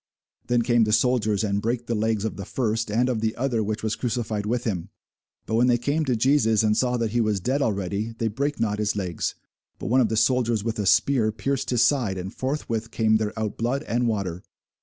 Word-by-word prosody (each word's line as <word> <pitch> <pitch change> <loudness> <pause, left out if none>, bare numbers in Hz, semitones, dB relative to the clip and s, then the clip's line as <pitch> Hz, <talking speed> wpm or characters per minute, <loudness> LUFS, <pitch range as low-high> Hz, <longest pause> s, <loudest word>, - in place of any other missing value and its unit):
Then 120 -1 +2
came 120 -1 +3
the 105 - -1
soldiers, 110 -3 +2
and 100 -1 0
brake 120 +2 -2
the 120 - -2
legs 110 -1 0
of 110 - -3
the 100 - -6
first, 115 0 -1
and 120 +4 +2
of 120 -4 -1
the 110 0 -1
other 120 -3 0
which 105 +1 -3
was 110 -1 0
crucified 110 -4 -2
with 120 +2 -1
him. 95 -7 -3 0.6
But - - -5
when 120 +2 +4
they 120 -1 +4
came 145 +6 0
to 130 -3 +1
Jesus, 115 -3 +3
and 105 -1 +3
saw 125 +1 +1
that 115 -2 -1
he 120 +1 +1
was 105 -3 +1
dead 130 +9 0
already, 100 0 -1
they 115 - 0
brake 140 +6 -2
not 105 -2 0
his 105 -1 0
legs: 90 -5 -2 0.4
but - - -5
one 130 +1 +5
of 115 - +2
the 110 - -1
soldiers 115 -2 +2
with 115 0 -3
a 100 - 0
spear 115 -1 +3
pierced 135 +4 -2
his 125 -1 +3
side, 120 -7 +1
and 95 +1 -6
forthwith 115 -5 -3
came 110 -2 +2
there 110 0 -3
out 110 -2 -3
blood 125 +5 -1
and 120 -3 0
water. 95 -6 -2
115 Hz, 230 wpm, -24 LUFS, 105-125 Hz, 0.6 s, one